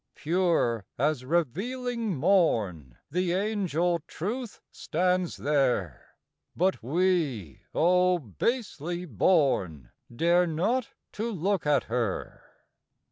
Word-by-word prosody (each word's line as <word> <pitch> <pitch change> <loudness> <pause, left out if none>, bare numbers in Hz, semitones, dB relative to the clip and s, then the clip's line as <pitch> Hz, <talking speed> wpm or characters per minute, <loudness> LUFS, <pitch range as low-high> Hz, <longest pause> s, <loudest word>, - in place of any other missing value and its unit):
Pure 165 - +1
as 145 0 0
revealing 205 - -1
morn 110 - +1
The 180 +1 0
angel 180 -4 0
Truth 225 +6 -5
stands 180 +1 -1
there; 130 - -1 0.4
But 185 +3 +1
we, 145 - 0
oh 180 +1 +4
basely 175 - -3
born! 100 - +1 0.2
Dare 170 +8 +3
not 220 +11 0 0.2
to 230 +3 -3
look 190 -3 -1
at 145 -1 +3
her. 115 -4 -3
170 Hz, 90 wpm, -28 LUFS, 130-185 Hz, 0.4 s, oh